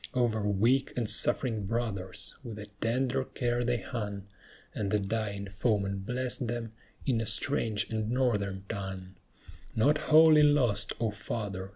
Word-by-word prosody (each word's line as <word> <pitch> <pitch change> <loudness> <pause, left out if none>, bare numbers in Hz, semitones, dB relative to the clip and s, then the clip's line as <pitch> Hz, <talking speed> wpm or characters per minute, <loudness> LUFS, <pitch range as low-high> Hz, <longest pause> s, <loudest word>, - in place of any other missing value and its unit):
Over 120 -3 +2
weak 115 +7 +2
and 120 -3 0
suffering 110 -3 0
brothers, 100 -5 -3
with 115 -4 -7
a 105 - -6 0.2
tender 130 +3 +1
care 120 -2 -1
they 120 0 +1
hung, 100 -4 -5 0.5
And 100 -2 -2
the 105 - +3
dying 100 -1 -2
foeman 100 -1 0
blessed 125 +4 -2
them 115 -1 -3 0.3
in 120 -5 +1
a 115 - -2
strange 110 -2 +1
and 110 -1 -1
Northern 105 -7 0
tongue. 95 -2 -5 0.6
Not 145 +7 +3
wholly 155 0 +8
lost, 125 -9 +3
O 115 -2 0
Father! 100 -3 -4
110 Hz, 145 wpm, -30 LUFS, 100-125 Hz, 0.6 s, wholly